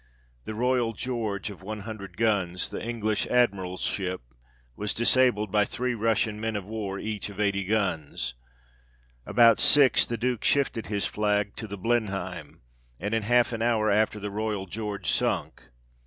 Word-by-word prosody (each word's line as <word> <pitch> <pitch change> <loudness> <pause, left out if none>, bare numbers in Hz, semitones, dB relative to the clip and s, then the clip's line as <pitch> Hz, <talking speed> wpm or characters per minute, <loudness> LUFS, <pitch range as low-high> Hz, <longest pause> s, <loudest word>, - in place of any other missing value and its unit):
The 110 - -5
Royal 125 0 +1
George 110 -4 -3
of 95 -3 -12
100 100 -2 -7
guns, 100 -5 +1
the - - -5
English 110 -2 -1
Admiral's 95 -7 +1
ship, 95 -2 -2 0.5
was 105 -1 -3
disabled 120 -4 +3
by 105 0 +4
three 125 +4 -2
Russian 110 -1 0
men 110 -1 -2
of 100 -3 -3
war, 105 -2 -4
each 105 0 -4
of 100 0 -11
80 100 -2 +1
guns. 80 - -1 0.9
About 115 -1 +5
six 140 -3 +6
the 120 - -3
Duke 125 0 -1
shifted 135 -5 +1
his 100 -3 -1
flag 105 +1 0
to 110 - -5
the 100 0 -6
Blenheim, 95 -7 -2 0.4
and 100 +5 -3
in 115 - +2
half 120 +2 +3
an 115 - -3
hour 110 -2 +2
after 105 +1 +2
the 105 0 -5
Royal 105 -2 -2
George 105 +1 -5
sunk. - - 0
105 Hz, 155 wpm, -27 LUFS, 100-115 Hz, 0.9 s, six